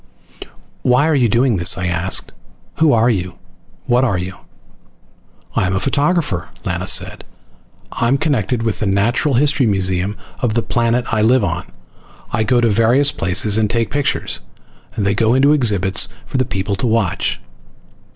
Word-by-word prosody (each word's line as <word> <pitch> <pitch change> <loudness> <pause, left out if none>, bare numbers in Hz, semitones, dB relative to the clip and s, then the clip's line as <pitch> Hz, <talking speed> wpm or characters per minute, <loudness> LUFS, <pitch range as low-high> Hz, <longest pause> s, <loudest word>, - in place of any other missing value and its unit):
"Why 125 +4 +2
are 160 - +2
you 125 -4 +2
doing 120 0 +2
this?" 85 - +4
I 90 - -3
asked. 90 +1 -1 0.5
"Who 160 -2 +3
are 115 0 +3
you? 90 -4 -4 0.5
What 125 +1 +2
are 115 -8 +1
you?" 90 +1 -5 1.2
"I'm 95 0 0
a - - 0
photographer!" 145 - -1 0.2
Lana - - -3
said. - - +2 0.7
"I'm 120 +4 0
connected 125 -5 -1
with 115 -3 -2
the 105 - -1
natural 115 +8 +1
history 140 -1 +3
museum 95 0 0 0.2
of 115 -3 -1
the 115 - 0
planet 120 +1 0
I 110 - +1
live 120 +2 +3
on. 85 -5 -3 0.7
I 110 - 0
go 120 +2 +2
to 120 - +2
various 115 +7 +3
places 100 +2 +1
and 105 -1 +1
take 115 0 -1
pictures, 145 0 -2 0.6
and 100 - -2
they 100 - +2
go 115 +3 +2
into 140 +3 +4
exhibits 100 -8 +2 0.2
for - - -4
the 130 - +1
people 100 -1 -3
to 125 - -1
watch." 110 -5 -1
115 Hz, 160 wpm, -17 LUFS, 100-130 Hz, 1.2 s, this